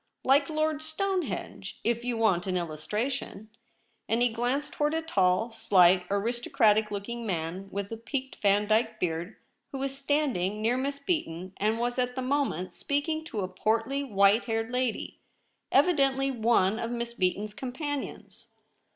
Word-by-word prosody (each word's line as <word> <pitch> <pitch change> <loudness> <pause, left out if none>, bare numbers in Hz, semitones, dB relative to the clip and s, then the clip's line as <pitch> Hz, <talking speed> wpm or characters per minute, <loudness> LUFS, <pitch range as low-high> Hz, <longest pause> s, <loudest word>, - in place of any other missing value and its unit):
' - - -54
Like 280 +1 +3
Lord 310 -1 0
Stonehenge, 315 - -3
if 235 +1 0
you 245 -1 -1
want 195 -5 +2
an 185 -1 0
Illustration,' 205 - -3 0.6
and 230 +2 +2
he 245 - +4
glanced 245 +5 -1
towards 295 +1 0
a 325 - -1
tall, 195 - +2
slight, 185 -4 +4
aristocratic 215 0 +2
looking 220 +4 -4
man 185 -1 -3
with 200 +1 -4
a 225 - -4
peaked 265 +3 -5
Vandyke 215 +2 +2
beard, 170 +3 -2 0.4
who 275 - -4
was 270 0 -3
standing 270 -9 0
near 225 +3 +2
Miss 275 +2 -2
IN 280 - -22
THE 360 - +3
LOBBY. 315 - +1
Beaton, 175 +3 -8
and 215 +2 +1
was 245 +1 -1
at 250 0 0
the 260 - -2
moment 260 - -1
speaking 310 +2 -1
to 230 -11 -4
a 185 - -1
portly 225 +8 0
white 205 -2 +4
haired 225 0 -2
lady, 250 -2 -2 0.5
evidently 275 -4 +3
one 225 -4 +2
of 230 - -2
Miss 235 0 -3
Beaton's 205 0 -1
companions. 280 +4 -5
230 Hz, 160 wpm, -28 LUFS, 200-275 Hz, 0.6 s, he